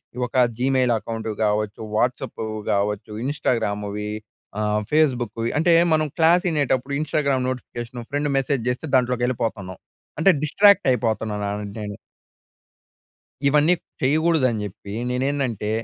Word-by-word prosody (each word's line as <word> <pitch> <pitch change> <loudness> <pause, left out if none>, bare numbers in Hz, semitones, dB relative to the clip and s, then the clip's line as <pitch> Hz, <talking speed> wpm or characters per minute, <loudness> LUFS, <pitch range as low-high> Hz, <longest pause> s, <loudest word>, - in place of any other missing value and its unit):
ఈ - - -11
ఒక 130 - 0 0.2
Gmail 130 -1 +2
account 115 0 -5
కావచ్చు, 105 0 -1
వాట్సాపు 120 -1 -1 0.3
కావచ్చు, 105 +2 -1
ఇంస్టాగ్రామ్‌వి 105 -6 -1 0.5
ఆహ్ 105 0 +1
ఫేస్‌బు‌‌క్‌వి 120 -7 +1
అంటే 170 +2 +4 0.2
మనం 155 0 +2
class 170 +3 +4
ఇనేటప్పుడు 140 -2 0
Instagram 140 -4 0
notification 120 -1 -6
friend 145 0 0
message 135 -3 0
జెస్తే 125 +5 -3
దాంట్లోకి 125 -1 0
వెళ్ళిపోతున్నాం. 110 -6 -3 0.4
అంటే 160 - +5
డిస్ట్రాక్ట్ 200 +5 +5
అయిపోతున్నాను 105 -3 -1 0.2
నేను. 105 -1 -6 1.5
ఇవన్నీ 150 +4 +4 0.3
చెయ్యగూడదని 140 -5 +2
జెప్పీ, 100 0 -9 0.2
నేనేందంటే, 125 -4 -1
125 Hz, 110 wpm, -23 LUFS, 105-145 Hz, 1.5 s, అంటే